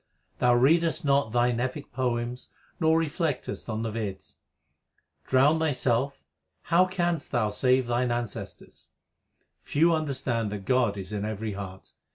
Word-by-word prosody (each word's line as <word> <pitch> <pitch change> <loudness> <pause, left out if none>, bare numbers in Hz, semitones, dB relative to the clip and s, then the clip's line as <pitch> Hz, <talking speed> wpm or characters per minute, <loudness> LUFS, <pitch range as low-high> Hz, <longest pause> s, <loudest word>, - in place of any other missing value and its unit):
Thou 125 0 +4
readest 160 +5 +3
not 140 -5 +2
thine 120 0 +2
epic 130 +4 -4
poems 120 -1 -2 0.3
nor 160 -1 +4
reflectest 155 -5 -2
on 110 0 -2
the 115 - -2
Veds: 100 -4 -6 0.9
Drowned 140 +5 +4
thyself, 135 -3 0 0.4
how 175 +2 +4
canst 175 -4 -1
thou 110 -5 +1
save 125 +5 +2
thine 120 +1 0
ancestors? 120 -3 -6 0.7
Few 165 +4 +2
understand 130 -8 -1
that 100 -2 -6
God 120 -5 +2
is 95 +1 -6
in 105 -1 -2
every 110 0 -3
heart. 95 -1 -8
125 Hz, 135 wpm, -27 LUFS, 110-150 Hz, 0.9 s, Thou